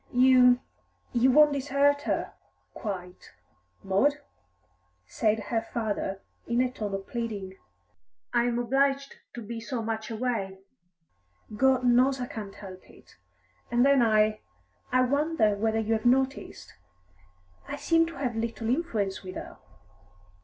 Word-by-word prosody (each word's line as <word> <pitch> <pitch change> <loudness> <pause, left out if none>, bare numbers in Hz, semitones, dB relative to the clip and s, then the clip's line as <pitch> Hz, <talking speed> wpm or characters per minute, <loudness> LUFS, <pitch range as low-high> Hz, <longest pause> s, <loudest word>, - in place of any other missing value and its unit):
"You 250 0 +5 0.5
you 245 +2 +4
won't 295 +2 +6
desert 285 +1 +2
her - - -1 0.4
quite 185 -5 -7 0.5
Maud?" 200 +10 +2 0.9
said 215 - 0
her 230 -2 +1
father 215 -4 -3 0.2
in 235 +1 0
a 250 0 +1
tone 210 -5 -4
of 195 0 -6
pleading. 205 -6 -5 0.7
"I 240 0 +3
am 240 -1 0
obliged 275 +3 0 0.2
to 235 - -6
be 230 +2 -6
so 235 0 -4
much 220 0 -4
away 220 -5 -3 1.0
God 260 +2 +3
knows 255 +2 +4
I 250 - -2
can't 210 -4 -8
help 185 -2 -11
it. - - -19 0.5
And 240 +2 +3
then 280 -2 +5
I 215 -1 +3 0.5
I 255 0 +4
wonder 280 -4 +2
whether 220 +2 0
you 225 0 0
have 220 +1 -2
noticed? 265 +2 0 0.9
I - - -4
seem 330 0 +2
to 335 - -9
have 255 -4 -3
little 225 0 -3
influence 225 - -1
with 185 -1 -9
her." - - -8
235 Hz, 135 wpm, -27 LUFS, 215-265 Hz, 1.0 s, won't